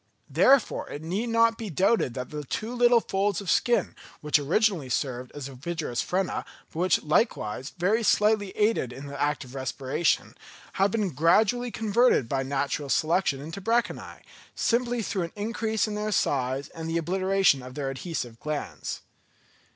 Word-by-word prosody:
Therefore 270 -2 +3
it 145 - -7
need 195 +9 -2
not 230 0 +3
be 220 -3 -5
doubted 190 - +1
that 125 -1 -5
the 150 -1 -5
two 220 - -4
little 240 -1 +5
folds 195 -2 0
of 200 - -2
skin, 240 -1 +2 0.2
which 150 0 +2
originally 170 -1 +1
served 125 -1 -2
as 145 -2 -6
ovigerous 140 -1 -3
frena, 185 +1 -1 0.3
but 160 - -6
which, 180 0 +2
likewise, 150 - 0
very 200 +6 +2
slightly 210 -2 +3
aided 210 - +1
in 135 +3 -9
the 140 0 -6
act 145 0 0
of 125 -1 -13
respiration, 135 +4 -1 0.5
have 195 - +5
been 205 -3 -1
gradually 210 - +3
converted 220 - +2
by 135 +2 -1
natural 140 +1 -2
selection 160 -1 +1
into 160 +7 -7
branchiæ, 230 +4 -1 0.3
simply 240 -1 0
through 195 -2 -2
an 170 -1 -4
increase 220 +1 -1
in 215 - -4
their 210 +1 -2
size 135 -6 0
and 165 0 -7
the 165 - 0
obliteration 185 -2 +2
of 125 0 -10
their 140 -2 -2
adhesive 130 -5 -5
glands. 150 -1 -4
175 Hz, 160 wpm, -27 LUFS, 140-215 Hz, 0.5 s, little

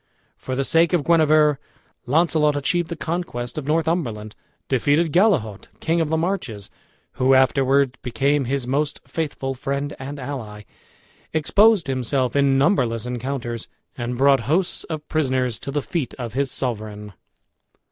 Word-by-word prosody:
For 130 - -5
the 135 - 0
sake 165 +5 +3
of 170 -5 +2
Guenever, 155 -3 +4 0.5
Launcelot 150 +1 +2
achieved 165 +4 0
the 170 - -4
conquest 160 -8 -4
of 140 - -8
Northumberland, 150 -10 -1 0.3
defeated 145 +5 +2
Gallehaut, 165 - +2
King 165 +1 +1
of 160 - -1
the 160 - +1
Marches, 160 - -3 0.5
who 130 +1 +5
afterwards 135 0 +3
became 140 +3 0
his 135 0 -2
most 145 +4 -1
faithful 145 -4 -3
friend 140 +2 -3
and 140 +2 -6
ally, 115 -6 -6 0.7
exposed 200 +6 +4
himself 130 -1 -1
in 140 -1 +3
numberless 125 - +1
encounters, 125 -2 -4 0.3
and 120 0 -4
brought 135 +1 +5
hosts 175 +4 0
of 155 -2 -6
prisoners 130 -6 0
to - - -7
the 145 0 -2
feet 160 -9 -3
of 120 -3 -6
his 135 +1 0
sovereign. 105 -5 -4
140 Hz, 140 wpm, -22 LUFS, 125-160 Hz, 0.7 s, who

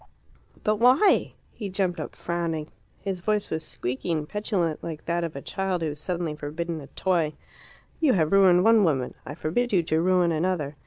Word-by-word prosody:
"But 215 0 +2
why?" 255 - +4 0.2
He 205 -4 -6
jumped 185 -2 -1
up, 155 - -6
frowning. 165 -3 -3 0.3
His 195 -2 -3
voice 210 +2 0
was 160 0 -2
squeaky 130 +3 -3
and 155 -2 -1
petulant, 190 -6 -1
like 160 -2 -6
that 170 0 0
of 165 -3 -4
a 140 - -6
child 190 -3 -2
who 160 - 0
is 145 0 -7
suddenly 170 -1 -2
forbidden 160 +2 -4
a 140 - -10
toy. 170 -4 0 0.7
"You 300 -5 +4
have 160 -5 +2
ruined 185 -2 +6
one 225 -1 +6
woman; 135 -8 +1
I 145 - -6
forbid 210 +10 -1
you 180 -4 +3
to 160 0 +1
ruin 180 -1 +3
another. 160 -3 -1
170 Hz, 190 wpm, -26 LUFS, 155-195 Hz, 0.7 s, ruined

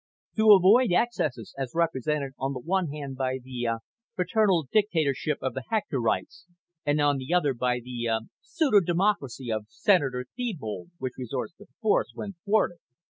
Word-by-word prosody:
To 220 -1 +8
avoid 200 +4 +6
excesses 155 - 0
as 135 -2 -3
represented 150 -4 0
on 135 +1 -1
the 130 - -5
one 180 +6 0
hand 140 -2 -6
by 130 0 -1
the, 125 -2 -5
uh, 115 0 0 0.4
paternalistic 190 - +2
dictatorship 150 -5 0
of 130 - -1
the 130 - -4
Hectorites, 140 - -1 0.4
and 145 +1 +1
on 145 -1 +3
the 130 +4 -6
other 150 -6 +2
by 125 0 0
the, 120 -1 -4
uh, 110 -1 +1 0.2
pseudo 295 -11 +3
democracy 170 - 0
of 110 -1 -2
Senator 135 - +2
Thebold 175 - -4
which 130 -4 -4
resorts 130 +4 -4
to 205 - -15 0.2
force 215 - +2
when 200 - -5
thwarted. 205 -4 +1
145 Hz, 160 wpm, -27 LUFS, 130-190 Hz, 0.4 s, To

